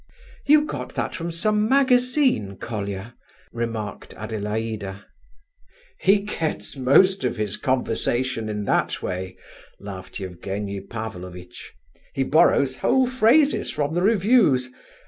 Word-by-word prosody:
"You 300 +1 +6
got 310 - -6
that - - -2
from 170 0 -4
some 210 +5 +1
magazine, 255 - +2
Colia," 100 0 -5 0.4
remarked 115 -3 -5
Adelaida. 105 -2 -4 0.9
"He 200 +2 +4
gets 165 -9 -4
most 185 +9 +4
of - - -1
his 105 -2 -2
conversation 125 -2 -1
in 105 -1 -3
that - - 0
way," 95 0 -4 0.4
laughed 95 -1 -8
Evgenie 100 +2 -5
Pavlovitch. 90 -4 -8 0.4
"He 135 - +1
borrows 140 -2 +3
whole 265 -1 +3
phrases 260 +4 +3
from 145 +1 -2
the 175 - 0
reviews. 195 - +3
125 Hz, 110 wpm, -23 LUFS, -, 0.9 s, You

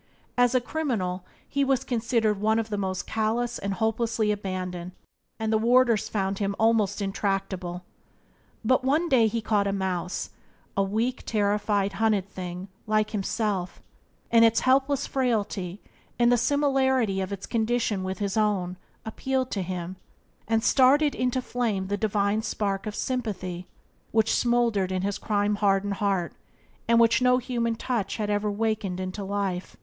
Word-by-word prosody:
As 245 0 +3
a - - +6
criminal 230 - -2 0.2
he 280 - 0
was 270 -2 +1
considered 225 -3 0
one 220 +1 +3
of 225 -1 -1
the 205 - -1
most 190 -1 -2
callous 230 +2 -1
and 200 0 -2
hopelessly 225 0 0
abandoned, 185 -3 -4 0.4
and 220 -1 -1
the 220 - +3
warders 235 -1 +3
found 195 -2 -1
him 200 -1 -1
almost 215 -3 +2
intractable. 195 -2 -2 0.8
But 255 +2 +3
one 305 +6 +2
day 235 -6 +5
he 225 0 -2
caught 205 -3 +1
a - - +1
mouse 190 -2 -2 0.2
— - - -36
a 200 - +2
weak, 220 +6 -1
terrified, 205 -1 +1
hunted 210 -4 +2
thing 180 -1 -6 0.2
like 215 0 +1
himself 200 -2 -2 0.3
— - - -38
and 230 -1 +6
its 225 0 +4
helpless 275 +2 +2
frailty, 210 -7 -1 0.4
and 240 0 +4
the - - +6
similarity 265 -6 +2
of 190 +1 -4
its 200 -1 -5
condition 225 -3 0
with 190 0 -3
his 200 -2 -2
own, 195 -4 0 0.3
appealed 260 +3 -2
to 195 - -1
him, 180 0 -5 0.5
and 225 0 +1
started 280 +3 +4
into 250 0 -1
flame 215 -7 -1
the 205 - +1
divine 205 0 +1
spark 200 -2 -2
of 210 - -4
sympathy 185 -8 -3 0.4
which 220 0 +2
smouldered 235 -6 +2
in 185 0 -1
his 200 0 -2
crime 205 -1 0
hardened 200 -1 +2
heart, 195 -4 0 0.5
and 235 0 +5
which 230 +1 +4
no 250 0 +5
human 235 -2 -1
touch 225 -4 -2
had 210 -2 -1
ever 205 0 0
wakened 205 -3 -1
into 185 +2 -4
life. 195 -2 -3
215 Hz, 160 wpm, -26 LUFS, 195-235 Hz, 0.8 s, a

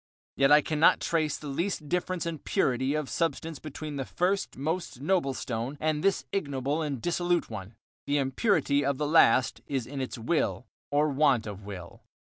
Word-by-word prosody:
Yet 135 +1 +4
I 150 +1 +8
cannot 155 +2 +4
trace 155 -3 0
the - - -11
least 155 +2 -2
difference 180 +2 -1
in 165 -2 -3
purity 130 -4 0
of 155 -2 -2
substance 160 -1 -2
between 155 -1 -6
the 135 - -1
first 185 +5 -1
most 160 0 -3
noble 145 -3 +1
stone, 120 +4 -4
and 155 -1 0
this 195 -1 +2
ignoble 140 -4 -1
and 145 -5 -2
dissolute 175 0 0
one. 105 0 -7 0.3
The 145 +1 +2
impurity 140 - +2
of 140 0 0
the 150 - -1
last 135 -4 +4
is 135 -4 -2
in 135 +2 -5
its 130 - -4
will 125 +2 0 0.2
or 150 +1 +2
want 135 -5 +3
of 100 -1 -7
will. 90 -4 -9
145 Hz, 175 wpm, -28 LUFS, 130-165 Hz, 0.3 s, I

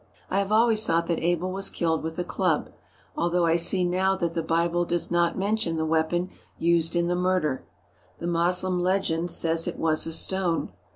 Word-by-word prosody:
I 195 - +2
have 200 +1 -2
always 220 0 +4
thought 170 -4 +1
that 170 -1 -2
Abel 175 +2 0
was 195 +1 -2
killed 160 -2 -1
with 160 0 -5
a 180 - -1
club, 175 -3 -1 0.4
although 175 0 +1
I 165 0 +3
see 175 +2 +3
now 185 +2 +1
that 170 -3 -2
the 165 - -1
Bible 170 +2 0
does 175 0 -1
not 170 -1 +1
mention 200 -4 -1
the 160 - -1
weapon 165 +3 0 0.3
used 170 0 +1
in 170 0 +1
the 175 - 0
murder. 180 -6 -1 0.5
The - - -7
Mos 175 +1 +2
lem 185 -1 -1
legend 175 -2 0
says 165 -1 0
it - - -4
was 160 0 0
a - - -3
stone. 175 - 0
175 Hz, 195 wpm, -25 LUFS, 165-185 Hz, 0.5 s, always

